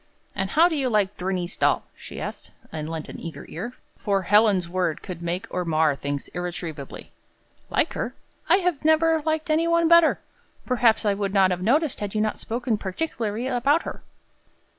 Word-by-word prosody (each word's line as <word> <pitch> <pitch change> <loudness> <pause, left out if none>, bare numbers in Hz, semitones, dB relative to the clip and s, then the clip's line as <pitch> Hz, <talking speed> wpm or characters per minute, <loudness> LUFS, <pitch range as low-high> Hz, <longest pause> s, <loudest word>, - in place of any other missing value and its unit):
"And 195 -1 -2
how 320 - +5
do 340 - -2
you 270 -3 0
like 210 -4 +1
Bernice 180 0 -3
Dahl?" - - +2
she - - -9
asked, - - -6 0.2
and 155 -1 -5
lent 160 -2 -5
an - - -8
eager 165 -1 -8
ear; 235 +9 -5 0.3
for 200 -2 0
Helen's 205 -2 +4
word 175 -2 -1
could 175 -2 -7
make 170 +2 -3
or 180 - -1
mar 160 -3 +2
things 140 0 -4
irretrievably. 170 -5 -6 0.6
"Like - - +1
her? - - -4 0.3
I 340 - +7
have 345 -5 0
never 315 +1 +4
liked 315 +1 -1
any 325 +2 +2
one 335 0 +3
better. 335 -1 +6 0.5
Perhaps 235 -3 +3
I 205 - +3
would 200 0 -2
not 190 -1 +5
have 180 0 -2
noticed, 285 - +2
had 205 0 -4
you 215 - +2
not 215 0 -1
spoken 235 -1 -2
particularly 220 +1 -3
about 270 +5 +2
her." - - -7
210 Hz, 185 wpm, -24 LUFS, 180-285 Hz, 0.6 s, I